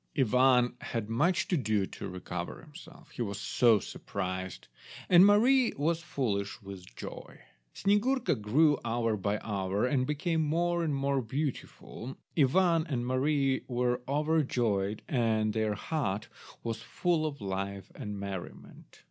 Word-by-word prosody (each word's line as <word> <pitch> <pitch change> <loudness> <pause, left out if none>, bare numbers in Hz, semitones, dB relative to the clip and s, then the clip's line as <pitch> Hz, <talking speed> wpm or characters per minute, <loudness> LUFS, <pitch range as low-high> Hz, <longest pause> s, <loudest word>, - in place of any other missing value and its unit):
Ivan 125 -1 +4
had 115 -1 -4
much 170 +11 +2
to 180 - +2
do 110 - +1
to 100 - -7
recover 90 -1 -5
himself, 160 +1 -14
he - - -6
was 100 -3 -3
so 115 +1 +4
surprised, 95 -2 -5 0.4
and 180 0 +8
Mary 235 +5 +5
was 165 +4 0
foolish 105 -11 -2
with 95 - -11
joy. - - -9 0.3
Snyegurka 230 +6 +2
grew 145 +7 +3
hour 115 -1 0
by 100 +1 -1
hour, 100 0 -1
and 130 0 +1
became 160 +2 0
more 170 +3 +1
and 150 -3 0
more 140 0 +1
beautiful. 130 -1 -5 0.2
Ivan 165 +3 +3
and 125 -5 -2
Mary 135 +1 +1
were 125 -1 0
overjoyed, 125 -9 0
and 110 -4 +1
their 110 -1 0
hut 110 -5 -2 0.3
was 115 -1 -3
full 165 +4 0
of 145 -2 -6
life 100 -1 -4
and 105 -1 -6
merriment. 100 -2 -8
125 Hz, 135 wpm, -30 LUFS, 105-155 Hz, 0.4 s, and